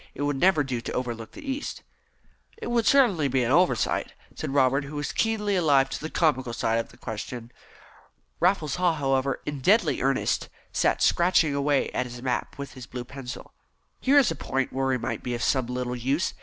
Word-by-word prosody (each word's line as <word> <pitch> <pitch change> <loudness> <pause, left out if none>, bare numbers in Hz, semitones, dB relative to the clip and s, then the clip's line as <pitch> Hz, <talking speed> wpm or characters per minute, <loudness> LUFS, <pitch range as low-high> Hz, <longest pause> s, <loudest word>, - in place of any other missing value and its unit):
It 145 - -3
would 145 -2 -1
never 180 -4 +4
do 130 -3 -3
to - - -5
overlook 120 -3 -4
the 300 - -10
East." 275 +2 -4 0.7
"It 450 - -5
would 235 -2 +2
certainly 210 - +4
be 130 -1 +1
an 120 - 0
oversight," 155 - +2 0.2
said - - -5
Robert, 135 0 +2
who 145 +2 -8
was 145 0 -2
keenly 215 -3 0
alive 140 -6 +3
to - - -4
the 155 - -4
comical 130 -9 +1
side 115 -1 0
of 115 - -4
the - - -18
question. 115 +2 -6 0.9
Raffles 175 -4 +1
Haw, 180 -2 +3
however, 135 -2 0
in 145 -1 -4
deadly 200 - +3
earnest, - - 0 0.2
sat - - +1
scratching 170 -4 +3
away 140 0 +1
at 125 - -1
his 120 0 -9
map 130 +2 -2
with 140 0 -7
his 130 -2 -10
blue 125 0 -6
pencil. 130 -1 -8 0.5
"Here 275 +2 +4
is 275 -5 +5
a - - -3
point 135 -1 -2
where 135 0 0
we 130 -1 +2
might - - -4
be 125 -1 -3
of 120 - -3
some 130 -3 +1
little 125 0 -3
use. 135 +8 0
140 Hz, 200 wpm, -26 LUFS, 125-170 Hz, 0.9 s, is